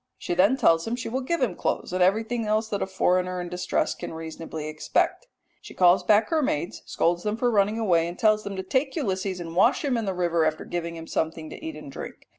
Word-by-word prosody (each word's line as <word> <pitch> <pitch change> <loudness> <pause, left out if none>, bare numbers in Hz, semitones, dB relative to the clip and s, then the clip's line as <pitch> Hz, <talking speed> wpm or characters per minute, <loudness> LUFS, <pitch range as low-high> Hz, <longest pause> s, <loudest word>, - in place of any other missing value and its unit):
She - - -3
then 195 +9 +4
tells 165 -7 +3
him 230 - -1
she 245 -1 -5
will 260 +3 -2
give 330 +3 -1
him 220 -8 +1
clothes 175 - -2
and 185 - 0
everything 220 +5 +1
else 215 +1 +1
that 205 -1 -2
a - - 0
foreigner 185 -1 +1
in 175 0 -5
distress 180 +1 -1
can - - -7
reasonably 160 -1 -6
expect. 155 - -1 0.3
She - - -12
calls 180 +1 +5
back 210 +4 +3
her 320 -2 +2
maids, 170 - -2
scolds 175 +1 +1
them 210 +2 -2
for 245 +1 +1
running 210 0 +2
away, 175 -7 +2
and 175 +1 -7
tells 215 -1 +3
them 200 -1 -5
to 190 - -4
take 260 +8 0
Ulysses 190 - -2
and 165 -1 -7
wash 235 - +3
him 260 -4 +1
in 225 - -2
the 190 -2 -2
river 170 -2 +1
after 155 0 -1
giving 170 -1 -4
him 165 0 -8
something 160 -1 -3
to - - -10
eat 320 0 -5
and - - -9
drink. - - -9
190 Hz, 240 wpm, -26 LUFS, 170-225 Hz, 0.3 s, calls